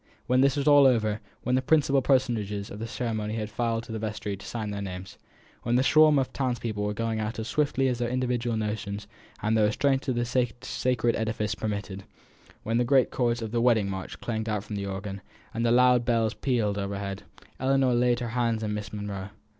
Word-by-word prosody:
When 125 +1 +2
all - - +5
was 140 +1 -1
over; 125 -7 +5 0.2
when 125 - 0
the 130 - +3
principal 140 -2 +3
personages 115 -7 0
of 105 - -7
the 115 - -4
ceremony 110 -2 -3
had 110 -1 -4
filed 115 0 -1
into 115 - -10
the 110 - -3
vestry 105 -2 -3
to 95 - -13
sign 110 -3 -4
their 100 0 -4
names; 95 0 -7 0.4
when 120 +1 0
the 130 - +4
swarm 155 +2 +6
of 135 -1 0
townspeople 120 -5 -2
were 105 - 0
going 115 0 -1
out 110 +1 -3
as 110 0 -4
swiftly 140 -2 +1
as 125 -2 -1
their 120 -1 0
individual 125 -2 -1
notions 105 -1 -3 0.4
of 110 +1 +1
the 110 - +3
restraints 135 +6 +1
of 130 - 0
the 120 0 0
sacred 120 -1 0
edifice 110 -1 -1
permitted; 100 -1 -4 0.6
when 115 +2 0
the - - +3
great 130 +1 +3
chords 120 -2 0
of 110 - -5
the 120 0 +1
"Wedding 110 -5 +3
March" 95 0 -6
clanged 110 -1 -3
out 105 -2 -1
from 105 -1 -6
the 100 -1 -3
organ, 95 0 -5 0.3
and 115 - -2
the 115 - +3
loud 125 0 +5
bells 115 -2 +1
pealed 110 -7 0
overhead 100 0 -4 0.4
Ellinor 130 -1 +2
laid 120 0 +2
her 120 - -2
hand 115 -2 0
in 105 -1 -2
Miss 105 -1 -5
Monro's. 100 -2 -5
115 Hz, 210 wpm, -27 LUFS, 105-125 Hz, 0.6 s, swarm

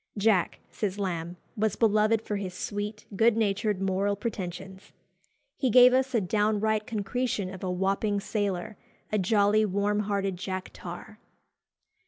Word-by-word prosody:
"Jack," 200 -4 +2
says 205 -3 -3
Lamb, 175 -3 -3 0.2
"was 215 -2 0
beloved 215 0 +3
for 210 - -2
his 190 -2 -5
sweet, 210 0 -4
good 225 +2 +4
natured 210 -1 0
moral 195 +1 0
pretensions." 190 -3 -6 0.6
He 260 - +1
gave 250 +2 +7
us 260 0 +1
"a 225 - +3
downright 215 +2 +1
concretion 210 -2 -2
of 190 - -9
a 185 - -1
Wapping 195 +3 0
sailor, 205 0 -2 0.3
a 215 - +1
jolly 205 +2 +3
warm 205 +1 0
hearted 200 -2 -1
Jack 185 0 -5
Tar." 185 +5 -9
205 Hz, 140 wpm, -28 LUFS, 190-215 Hz, 0.6 s, gave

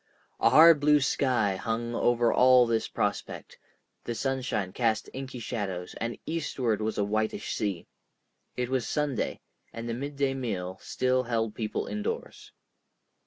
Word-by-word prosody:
A - - +5
hard 160 0 +8
blue 150 +1 +5
sky 125 -8 +1
hung 115 +3 -3
over 120 0 +2
all 125 -1 +6
this 115 -1 0
prospect, - - -3 0.4
the 120 - -4
sunshine 125 -7 -2
cast 110 -2 0
inky 135 -1 -6
shadows, 100 -6 -4
and 115 +1 -2
eastward 130 -9 -1
was 110 0 -2
a 105 - +2
whitish 110 +2 -1
sea. 100 -5 -2 0.7
It 125 0 -1
was 130 -3 -1
Sunday, 145 -5 -1 0.3
and 115 0 -6
the 115 - -2
midday 140 +2 -2
meal 95 -8 -4
still 130 0 0
held 115 -3 -1
people 110 -2 -3
indoors. 105 0 -5
120 Hz, 140 wpm, -28 LUFS, 110-130 Hz, 0.7 s, hard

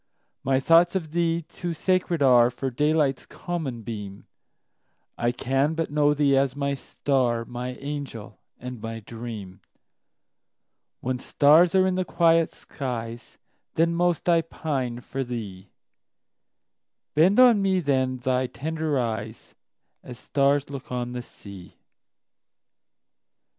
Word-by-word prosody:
My 135 0 +2
thoughts 170 +5 +4
of 160 -5 -2
thee 170 0 0
too 170 +2 -6
sacred 180 -2 0
areFor 125 0 +3
daylight's 150 -2 +1
common 150 -10 -5
beam:I 105 +2 -8
can 135 +5 0
but 165 -2 -2
know 150 0 +3
thee 140 -2 +3
as 135 -1 +1
my 140 0 -1
star, 125 -3 -1
My 125 +1 -5
angel 140 -6 -7 0.2
and 125 -2 -8
my 115 0 -6
dream; 110 -4 -8 1.4
When 125 0 -2
stars 160 +7 +4
are 185 0 +5
in 190 - +1
the 185 0 0
quiet 165 -2 +3
skies, 120 -3 -6 0.4
Then 165 +1 +2
most 175 0 0
I 170 -1 +4
pine 135 -7 -4
for 135 +2 -4
thee; 105 -6 -7 1.4
Bend 180 - +4
on 240 -5 +7
me 190 -1 +2
then 130 -5 0
thy 130 +1 0
tender 155 +4 -2
eyes, 110 -2 -4 0.5
As 125 -2 -10
stars 140 +2 +1
look 135 -2 -8
on 125 -1 -3
the 125 0 -4
sea! 100 -6 -13
135 Hz, 120 wpm, -25 LUFS, 120-160 Hz, 1.4 s, on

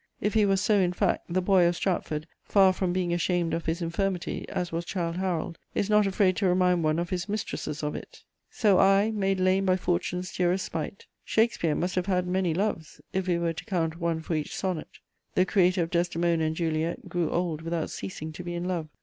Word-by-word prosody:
If 210 0 0
he 215 -2 +4
was 195 -1 +3
so 210 -1 +3
in 180 -2 +2
fact, 190 0 0
the 185 +1 +1
"Boy" 185 -2 +5
of 175 - +1
Stratford, 155 -5 -1 0.2
far 195 -2 +5
from 185 -1 -1
being 180 -1 0
ashamed 175 -1 0
of 165 - -3
his 165 +2 -1
infirmity, 180 +2 -2
as 180 -1 -3
was 165 +1 -2
Childe 170 -1 -3
Harold, 175 -3 -2 0.2
is 205 - 0
not 210 -1 +5
afraid 190 -1 +2
to 200 - +2
remind 180 -1 +3
one 155 0 +2
of 170 0 -2
his 180 0 -2
mistresses 200 -7 -3
of 150 - -1
it: - - -9 0.3
So 205 -5 +3
I, 195 +3 +5
made 195 -3 0
lame 190 +1 +2
by 185 0 +4
fortune's 180 0 -2
dearest 180 +1 +1
spite. 165 +4 -5 0.2
Shakespeare 220 -9 +1
must 180 +1 -1
have 185 0 -1
had 180 -2 +1
many 180 -1 0
loves, 165 -3 -2
if 190 0 -1
we 175 -2 +2
were 170 -1 0
to - - -8
count 170 -5 -1
one 165 -2 -1
for 165 - -4
each 155 -2 -2
sonnet. 185 -5 -2 0.5
The 185 - +4
creator 185 -2 +3
of 165 - -5
Desdemona 170 -1 +1
and 155 0 -1
Juliet 160 0 -2
grew 175 -3 -1
old 170 -3 -1
without 165 -1 -2
ceasing 160 -4 -6
to 180 - -7
be 175 0 -4
in 170 - -3
love. 170 -4 -2
180 Hz, 220 wpm, -27 LUFS, 170-190 Hz, 0.5 s, Boy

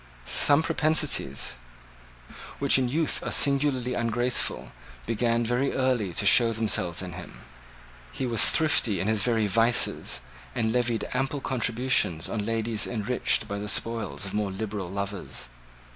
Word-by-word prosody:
Some 145 - +4
propensities, 155 -2 +1 1.0
which 140 -1 +4
in 125 -2 -1
youth 155 +4 -1
are - - -4
singularly 140 -3 +2
ungraceful, 120 +1 -1 0.3
began 115 +1 0
very 125 +4 -1
early 125 -7 0
to 105 - -1
show 115 +3 +5
themselves 95 -6 -1
in 90 -1 -7
him. 90 0 -11 0.7
He 130 - -4
was 115 -3 +4
thrifty 140 - +1
in 95 - -2
his 110 -2 +1
very 115 -1 +1
vices, 115 - +2 0.3
and 110 0 -1
levied 120 -3 -1
ample 135 +3 -2
contributions 120 - 0
on 110 -3 -3
ladies 115 0 -1
enriched 120 +1 -1
by 100 0 -5
the 105 0 -5
spoils 110 -1 -1
of 95 - -6
more 105 -1 -1
liberal 100 -1 -5
lovers. 100 -10 -6
115 Hz, 140 wpm, -26 LUFS, 100-125 Hz, 1.0 s, show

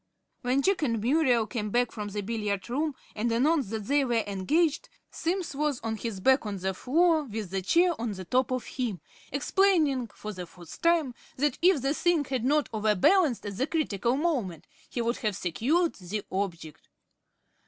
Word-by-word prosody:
When 260 +2 +1
Jack 390 -2 +2
and 230 -6 0
Muriel 245 -1 +3
came 210 -1 -3
back 245 +2 +1
from 210 -1 -5
the 205 0 -4
billiard 205 -2 -2
room 295 +2 -1 0.2
and 230 +2 0
announced 270 +1 +2
that 220 -1 -4
they 285 +3 +2
were 235 -4 +1
engaged, 290 - 0 0.2
Simms 350 -1 -2
was 295 -3 0
on 225 0 -2
his 220 -3 -5
back 265 +7 +4
on 205 -2 -4
the 190 +1 -2
floor 315 - +2
with 215 -6 -5
the 195 0 -1
chair 345 - +3
on 230 -3 -2
the 190 -1 -7
top 255 +7 +1
of 255 -1 -2
him 235 -8 -3 0.3
explaining, 290 -4 +2
for 215 0 -8
the 180 -2 -7
fourth 175 -1 -13
time, 335 -6 +2 0.2
that 285 0 0
if 350 -6 +4
the 275 +1 +2
thing 335 -2 +2
had 260 -3 -2
not 295 +3 +2
overbalanced 220 - +3
at 200 -2 -5
the 265 - 0
critical 250 - 0
moment 255 - -1 0.2
he 240 - -2
would 235 +1 0
have 215 -3 -1
secured 255 - +1
the 195 +3 -5
object. 170 -5 -4
245 Hz, 185 wpm, -28 LUFS, 205-300 Hz, 0.3 s, back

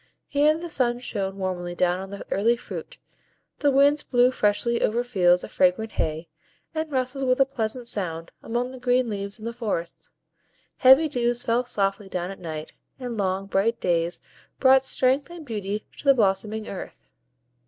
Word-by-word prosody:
Here 295 +2 +3
the 345 +1 -6
sun 250 -6 0
shone 200 -5 -4
warmly 180 -2 -3
down 180 +1 +1
on 190 0 -7
the 200 0 -8
early 230 +4 +2
fruit, - - -8 0.6
the 290 - +3
winds 285 +2 +4
blew 245 -2 +3
freshly 225 +1 +1
over 235 +3 +1
fields 180 -7 +3
of - - -8
fragrant 190 +4 +2
hay, 160 +1 -2 0.5
and 315 -1 -3
rustled 260 0 -1
with 255 +1 +2
a 270 - +6
pleasant 240 -2 -4
sound 170 -7 -3
among 240 +2 -2
the 260 - -10
green 245 -1 +1
leaves 200 +1 -3
in 215 - -10
the 235 - -3
forests; 210 -8 -4 0.7
heavy 265 +4 +7
dews 240 -3 0
fell 235 +2 +1
softly 195 -3 -1
down 180 0 -3
at 195 - -10
night, 155 -3 -6 0.3
and 245 -2 -5
long, 195 -2 -1
bright 200 +4 0
days 170 -1 0 0.4
brought 265 0 +6
strength 265 +2 +1
and 345 -2 -10
beauty 210 -3 -4
to - - -11
the 275 -1 +6
blossoming 215 0 0
earth. 195 - -8
230 Hz, 175 wpm, -25 LUFS, 195-255 Hz, 0.7 s, heavy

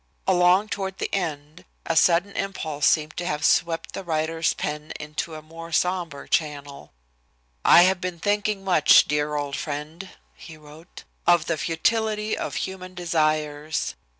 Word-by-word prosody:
Along 180 +3 +4
toward 195 -2 -4
the - - -4
end 155 -5 -4 0.2
a - - -1
sudden 175 +3 +4
impulse 160 -7 -2
seemed 155 -1 +1
to 175 - -3
have 150 -3 -1
swept 165 -1 +1
the 195 - -5
writer's 160 -1 -1
pen 150 +1 -5
into 150 +1 -5
a 155 - -9
more 165 +1 -10
sombre 175 -4 -1
channel. 145 - -3 0.7
"I 175 - +8
have 185 0 +2
been 180 -2 -4
thinking 205 +1 -1
much, 180 -6 +6
dear 150 0 -1
old 145 -1 -3
friend," 155 +5 -6 0.2
he 160 -2 -12
wrote, 155 +3 -14 0.2
"of 175 -2 +4
the 165 - 0
futility 215 +7 0
of - - -4
human 185 -1 -5
desires. 155 -3 -1
165 Hz, 150 wpm, -24 LUFS, 150-185 Hz, 0.7 s, I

